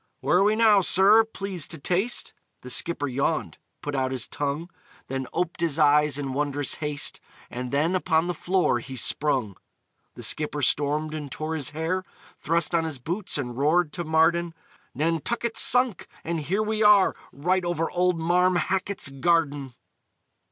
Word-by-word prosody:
"Where 180 - +2
are - - +4
we 210 +2 +3
now, 215 -3 +5
sir? 200 +5 +5
Please 195 -6 -2
to 165 - -7
taste." 185 - -1 0.3
The 125 - -7
skipper 155 -1 0
yawned, 140 +5 -2 0.2
put 145 - -4
out 130 -1 0
his 130 -3 -1
tongue, 145 +5 -4 0.4
Then 135 -1 -4
ope'd 175 -1 -3
his 165 -3 0
eyes 150 -2 +3
in 135 -2 -4
wondrous 145 0 -1
haste, 150 -1 0 0.3
And 125 0 -5
then 155 +6 +1
upon 165 -3 +1
the 180 - -2
floor 175 -6 0
he 130 +2 -9
sprung! 130 - +1 0.6
The - - -9
skipper 150 -1 -1
stormed 150 +3 +1
and 150 -3 -6
tore 155 +1 -4
his 145 -5 -1
hair, 160 +4 -2 0.4
Thrust 165 +1 0
on 165 -1 +2
his 160 -4 -3
boots, 175 - -2
and 125 -4 -4
roared 150 +4 +1
to 175 - -4
Marden, 165 +1 +1 0.4
"Nantucket's 165 - 0
sunk, 250 -6 +3 0.2
and 170 0 -3
here 190 +8 -1
we 215 0 -2
are 210 -2 +5 0.2
_Right 180 +6 0
over 175 -2 -2
old 180 -1 +1
Marm 180 +2 +2
Hackett's 190 -1 -1
garden!" 140 -2 0
160 Hz, 165 wpm, -25 LUFS, 145-180 Hz, 0.6 s, now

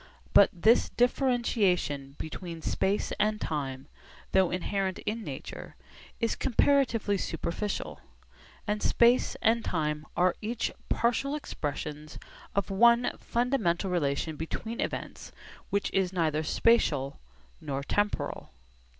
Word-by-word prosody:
But 200 - +8
this 220 +6 +3
differentiation 210 - +1
between 165 0 -7
space 195 +2 0
and 215 0 +1
time, 135 -5 -3 0.4
though 190 -2 +4
inherent 190 +1 -1
in 220 +2 -2
nature, - - -7 0.4
is 230 -1 0
comparatively 240 -6 +2
superficial; 180 +5 -3 0.7
and 210 0 -1
space 240 +2 +3
and 225 +1 +3
time 150 -2 -2
are 180 0 +3
each 225 +2 -2 0.2
partial 245 +5 +1
expressions 150 - -5 0.4
of 200 0 0
one 235 +4 +5
fundamental 220 -7 0
relation 150 -2 -1
between 220 +9 -4
events - - -5 0.4
which 200 0 0
is 190 -2 +1
neither 160 -4 +1
spatial 150 - +2 0.4
nor 140 -2 -3
temporal. 205 +7 -1
195 Hz, 105 wpm, -29 LUFS, 160-230 Hz, 0.7 s, But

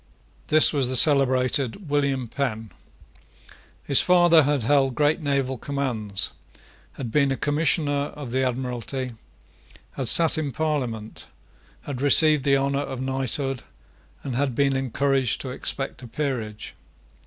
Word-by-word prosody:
This 155 +1 +4
was 140 -4 +2
the 130 - -1
celebrated 135 - +4
William 140 -4 0
Penn. 115 -4 -4 1.1
His 140 - +3
father 175 -2 +5
had 145 -3 0
held 135 0 +1
great 150 +3 +1
naval 135 -3 -2
commands, 120 -9 -3 0.6
had 120 -5 -7
been 140 0 +2
a 135 - -2
Commissioner 145 -1 0
of 140 -5 -7
the 130 +1 0
Admiralty, 125 0 -4 0.8
had 130 - -4
sate 160 +6 +5
in 145 -3 -3
Parliament, 125 -7 -4 0.5
had 135 -3 -7
received 150 0 +4
the 140 -1 +3
honour 140 +1 -1
of 135 -2 -5
knighthood, 135 0 -3 0.6
and 130 -3 -5
had 135 -1 -1
been 140 0 +1
encouraged 135 -1 0
to 130 - -6
expect 135 0 -5
a 125 - -10
peerage. 115 -5 -5
135 Hz, 130 wpm, -23 LUFS, 125-145 Hz, 1.1 s, father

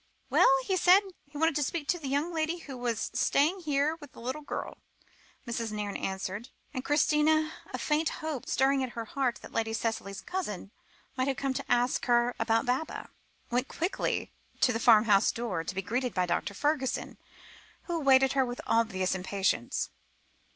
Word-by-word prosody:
"Well, - - +6 0.2
he 380 - +1
said 365 +3 +7 0.3
he 290 +1 -10
wanted 325 0 +2
to - - 0
speak 290 +1 -2
to 350 - +2
the 290 - -6
young 290 +6 0
lady 320 +1 0
who 285 -6 -9
was 240 -3 -2
staying 315 +7 +2
here, 300 -1 0
with 290 -3 -12
the - - -13
little 255 +6 -4
girl," 290 - -5 0.7
Mrs. 235 -2 -3
Nairne 210 -1 -3
answered, 195 +4 -4 0.2
and 255 - -3
Christina, 310 +2 +3 0.2
a - - -3
faint 305 +1 +1
hope 310 -5 -5
stirring 270 +1 +3
at 255 - -4
her 230 - -3
heart 255 +1 -1
that - - -10
Lady 225 0 -1
Cicely's 215 -4 -3
cousin 210 - -4 0.4
might 260 0 0
have 270 -2 0
come 275 -1 -1
to - - -5
ask 245 +1 +2
her 240 0 +3
about 225 +3 +2
Baba, 260 +5 -2 0.4
went 250 +2 +1
quickly 350 +4 -2 0.3
to 250 - +4
the 225 - -1
farmhouse 215 -3 +5
door, 230 -8 -3
to 175 - -5
be 195 - -2
greeted 245 +5 -2
by 180 -1 +2
Dr. 180 +3 -1
Fergusson, 290 +1 -1 0.6
who 345 -1 -2
awaited 270 -3 +5
her 270 -1 +3
with 245 -1 -5
obvious 195 -5 +1
impatience. 190 - -1
255 Hz, 180 wpm, -29 LUFS, 225-300 Hz, 0.7 s, said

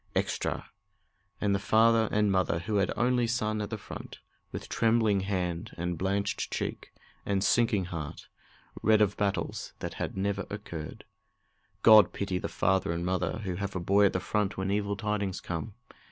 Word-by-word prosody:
Extra!" - - -1 0.7
And 100 -1 +1
the 100 - +1
father 110 +1 +4
and 105 -1 +2
mother 95 -3 +1
who 105 +5 -2
had 100 -1 +2
an - - -3
only 125 -1 +2
son 110 -2 -1
at 105 - -4
the 110 - -3
front, - - -9 0.3
with - - -6
trembling 110 -3 +2
hand, 90 -3 -3
and 90 +1 -2
blanched 100 +3 -1
cheek, - - -4 0.3
and 100 -1 0
sinking 115 -6 +3
heart, 80 -4 -6 0.5
read 110 -1 +4
of 105 -2 +3
battles 100 -2 -2
that - - -5
had - - -3
never 100 +1 -1
occurred. 85 -7 -7 0.8
God 110 -4 +8
pity 95 -2 -2
the - - -4
father 95 -2 +1
and 85 +1 -2
mother 90 +2 -1
who 90 -3 -3
have 100 0 -4
a - - 0
boy 100 +4 +4
at - - -2
the 90 - 0
front 105 +1 -1
when 95 +1 -1
evil 100 0 0
tidings 105 -2 -2
come! 90 +5 -5
100 Hz, 175 wpm, -29 LUFS, 95-105 Hz, 0.8 s, God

